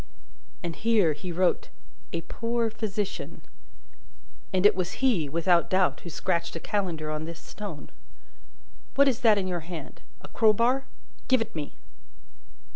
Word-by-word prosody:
"And 170 -2 -3
here 210 -8 +3
he 175 +4 -6
wrote 180 +1 +1 0.4
'a 170 - -2
poor 230 +5 -1
physician.' 210 -2 -4 1.1
And 190 0 +2
it 210 - +8
was 180 -2 -2
he, 215 - +2
without 170 +3 +3
doubt, 185 0 +2
who 170 - -8
scratched 170 +1 -1
a - - -3
calendar 165 -6 -2
on 155 +1 -3
this 165 0 -7
stone. 200 -8 -8 1.0
What 280 +1 +6
is 255 -4 +2
that 225 -5 +5
in 195 - 0
your 180 -1 -1
hand? 165 -2 -8 0.2
A - - -10
crowbar? 235 +5 +3 0.4
Give 260 -1 +5
it 225 - -3
me!" 150 -3 -5
185 Hz, 145 wpm, -27 LUFS, 170-225 Hz, 1.1 s, it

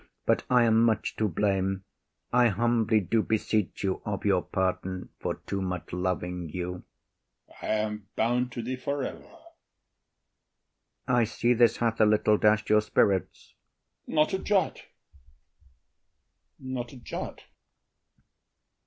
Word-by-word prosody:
But - - +2
I 125 -1 +5
am 115 -1 +4
much 115 -2 +1
to 110 - +1
blame. 95 0 0 0.5
I 125 0 +5
humbly 115 0 +2
do 110 +3 +1
beseech 110 -2 -1
you 95 -1 -1
of 105 -1 -4
your 95 -3 +3
pardon 95 0 -2
For - - -2
too 100 - -3
much 90 -3 -4
loving 90 -1 -2
you. 90 +2 -4 0.7
OTHELLO. - - -6
I - - +3
am 105 -2 -6
bound 120 +2 +1
to 120 - -4
thee 130 +2 -3
for 140 +1 -2
ever. - - -5
IAGO. - - -18 1.7
I 125 -1 +3
see 120 +2 +1
this 120 -1 +4
hath 115 -1 0
a 110 - +6
little 105 0 +3
dash’d 105 0 +3
your 105 0 +5
spirits. 100 -2 0 0.5
OTHELLO. - - -6
Not 155 +3 +3
a 190 - 0
jot, 200 -2 +1 1.8
not 130 -2 -5
a - - -10
jot. 120 - -6
110 Hz, 140 wpm, -28 LUFS, 95-120 Hz, 1.8 s, a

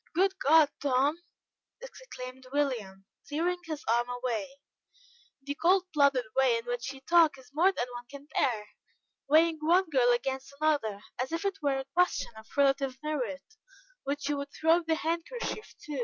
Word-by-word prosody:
"Good 385 +2 +2
God, 305 +1 +5
Tom!" 280 +3 +2 0.6
exclaimed 260 - -10
William, 230 -10 -2 0.2
tearing 340 +5 -1
his 310 -3 -5
arm 240 +2 +2
away, 245 -4 -2 1.0
"the 285 +1 -3
cold 360 +5 +3
blooded 280 -4 +3
way 260 -3 +4
in 230 - -6
which 245 +1 -3
you 270 -1 -12
talk 325 -1 +4
is 255 -1 -17
more 350 +6 +4
than 245 - -2
one 240 0 -7
can 280 0 -10
bear. 215 -6 0 0.6
Weighing 320 +1 +4
one 345 +2 +3
girl 250 -3 +4
against 265 +3 -2
another, 285 -10 +1 0.2
as 255 +3 -2
if 330 +3 -3
it 395 -2 -2
were 280 -2 +1
a 270 - -4
question 360 -7 +1
of 220 0 -13
relative 275 -2 +2
merit, 290 -2 -3 0.6
which 280 0 -3
you 290 0 0
would 280 0 -5
throw 325 +2 +4
the 325 -1 0
handkerchief 340 +9 -4
to. 295 -3 -4
280 Hz, 165 wpm, -29 LUFS, 255-325 Hz, 1.0 s, God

